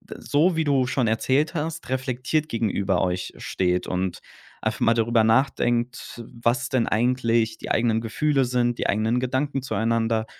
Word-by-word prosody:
d - - -11
so 160 +4 +1
wie 160 - +1
du 135 -4 +2
schon 130 -2 0
erzählt 130 +8 +1
hast, 160 0 -4
reflektiert 130 +4 -1
gegenüber 100 -6 0
euch 90 0 -2
steht 90 -1 -1
und 90 0 -2 0.4
einfach - - -2
mal 115 - +4
darüber 115 0 +2
nachdenkt, 120 0 0 0.2
was 120 +1 +1
denn 125 -3 +1
eigentlich 115 -1 +1
die - - -8
eigenen 115 -1 +2
Gefühle 135 +5 +1
sind 120 -1 0
die - - -1
eigenen 110 +4 +1
Gedanken 130 +2 -1
zueinander 115 -3 0
120 Hz, 155 wpm, -24 LUFS, 110-130 Hz, 0.4 s, mal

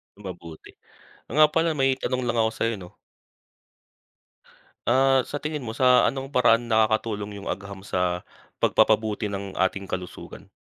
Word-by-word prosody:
Mabuti. 85 -5 -10 0.6
Oo - - -8
nga 155 0 +7
pala 165 +1 +1
may 135 -2 +1
tanong 130 0 -2
lang 120 -1 -1
ako 110 0 +2
sa'yo 115 +1 -1
no. 90 -3 -13 1.9
Ah, 130 +2 +3
sa 145 - -5
tingin 150 -2 -4
mo 110 - -4
sa 125 +2 +4
anong 135 +1 -5
paraan 120 -1 +4
nakakatulong 110 -2 +1
yung 100 - -9
agham 100 +1 -5
sa, 90 -1 -1 0.4
pagpapabuti 105 -1 +2
ng 100 -1 -5
ating 95 +1 0
kalusugan? 90 -1 -8
110 Hz, 140 wpm, -25 LUFS, 100-130 Hz, 1.9 s, nga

